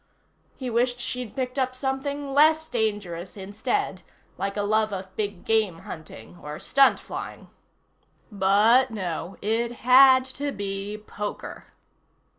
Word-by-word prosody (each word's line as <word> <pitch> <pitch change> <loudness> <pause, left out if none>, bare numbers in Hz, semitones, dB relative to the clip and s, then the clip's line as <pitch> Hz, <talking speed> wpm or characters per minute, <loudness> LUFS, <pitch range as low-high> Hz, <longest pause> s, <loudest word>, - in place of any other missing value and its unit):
He 260 - -5
wished 245 +1 +1
she'd 250 -2 -5
picked 255 0 -2
up 255 -1 0
something 275 +1 -3
less 315 +2 +4
dangerous 205 - -3
instead, 200 -1 -2 0.3
like 200 +1 -3
a 205 - 0
love 215 +1 +1
of 190 -1 -6
big 205 -3 -4
game 215 -7 +1
hunting, 165 +2 -10
or 150 0 -6
stunt 275 - +4
flying. - - -8 0.8
But 210 +6 +4
no. 185 -4 -4
It 230 +3 0
had 260 +1 +7
to 280 +2 -4
be 200 -1 -4
poker. 210 -1 -7
220 Hz, 125 wpm, -25 LUFS, 195-260 Hz, 0.8 s, had